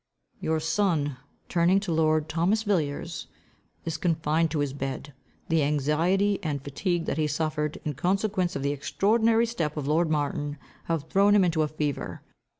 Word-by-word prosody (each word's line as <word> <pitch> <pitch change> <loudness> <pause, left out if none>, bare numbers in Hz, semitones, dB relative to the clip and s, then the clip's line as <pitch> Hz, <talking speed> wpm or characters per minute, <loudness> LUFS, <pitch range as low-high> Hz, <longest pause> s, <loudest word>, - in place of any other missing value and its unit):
"Your 160 0 0
son," 160 -5 0 0.3
turning 175 +3 +3
to 195 -4 -3
lord 155 -1 +2
Thomas 180 +8 +1
Villiers, 165 -4 -1 0.6
"is 165 -1 -2
confined 165 -1 +1
to 155 - -2
his 140 -2 -1
bed. 135 +1 -5 0.3
The 165 -3 +2
anxiety 160 +8 +2
and 150 -3 -2
fatigue 165 +6 -2
that - - -2
he 155 - +2
suffered, 150 0 -1
in 150 - -1
consequence 185 - 0
of - - -3
the 140 - +1
extraordinary 225 - +2
step 165 -10 -3
of 145 -2 -3
lord 160 +2 +2
Martin, 145 -1 -1 0.3
have 165 -3 -1
thrown 200 +4 +4
him 200 - +6
into 165 -2 +1
a 155 - +2
fever. 150 -2 -3
160 Hz, 160 wpm, -27 LUFS, 150-185 Hz, 0.6 s, him